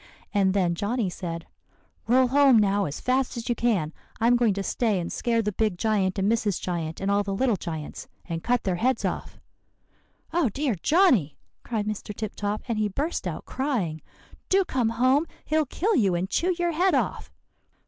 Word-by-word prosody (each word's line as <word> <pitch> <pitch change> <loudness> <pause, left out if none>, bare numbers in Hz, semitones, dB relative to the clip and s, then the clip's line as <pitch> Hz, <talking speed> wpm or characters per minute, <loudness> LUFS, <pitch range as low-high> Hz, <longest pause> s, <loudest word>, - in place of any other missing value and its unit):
And 195 -2 +2
then 180 -3 +2
Johnny 205 +2 -1
said, 170 -2 -5 0.6
'Roll 255 +2 +4
home 275 -2 +6
now 200 -1 +3
as 145 - -5
fast 255 0 0
as 235 - -5
you - - +3
can; 205 -11 0 0.3
I'm 235 +2 +4
going 235 -5 +2
to 200 - -2
stay 215 -2 0
and 170 - -4
scare 230 -1 0
the 210 - -1
big 210 -2 0
giant 200 -3 +1
and 195 0 +1
Mrs. 215 -4 +1
Giant 165 -3 -3
and 195 +1 0
all 200 0 +3
the 200 -1 -3
little 245 +1 +2
giants, 160 -4 -6 0.2
and 165 -1 -4
cut 245 0 +1
their 185 -3 0
heads 255 +6 +1
off.' - - -4 1.0
"'Oh, 335 -8 +2
dear, 275 +3 -1
Johnny!' 245 - +3 0.2
cried 220 -3 -3
Mr. 210 0 -5
Tip 215 -1 -5
Top, 205 +1 -2
and 230 -3 -1
he 215 - +2
burst 290 - -2
out - - -5
crying, 220 - -2 0.5
'do 385 0 +4
come 245 -7 0
home. 255 +7 +2 0.2
He'll 310 -1 +1
kill 415 - 0
you, 195 -8 +3
and 175 +2 -1
chew 355 - 0
your 345 -1 +1
head 360 +4 +2
off. - - -2
220 Hz, 190 wpm, -26 LUFS, 190-255 Hz, 1.0 s, home